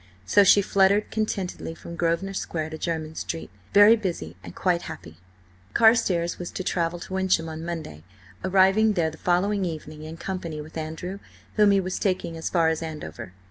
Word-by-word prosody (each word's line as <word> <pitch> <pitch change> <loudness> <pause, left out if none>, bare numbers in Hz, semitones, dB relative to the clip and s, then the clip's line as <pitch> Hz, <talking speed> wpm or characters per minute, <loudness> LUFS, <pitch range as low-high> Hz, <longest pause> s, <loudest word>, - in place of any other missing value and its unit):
So 155 - +5
she 200 +1 +6
fluttered 200 +2 +3
contentedly 195 -6 -3
from 170 - -9
Grosvenor 170 +3 0
Square 160 -4 -3
to 160 - -6
Jermyn 160 -2 -3
Street, 165 - -5 0.2
very 205 +3 +8
busy 170 - -4
and 85 - -10
quite 180 -2 +1
happy. 80 -1 -10 0.6
Carstares 210 -7 +3
was 175 - -5
to 185 - -4
travel 170 -1 -1
to 175 - -9
Wyncham 190 -3 +1
on 160 0 -6
Monday, 160 - -6 0.4
arriving 195 +3 +4
there 165 -4 +1
the 160 - -12
following 195 +3 +1
evening 155 -3 -5
in 160 +1 -8
company 170 -4 -5
with 155 +2 -10
Andrew, 160 +4 -5 0.3
whom 210 -1 +5
he 200 -1 +4
was 185 -1 -3
taking 185 -4 -1
as 165 - -3
far 165 -3 +3
as 160 0 -1
Andover. 150 - -7
175 Hz, 180 wpm, -25 LUFS, 160-195 Hz, 0.6 s, very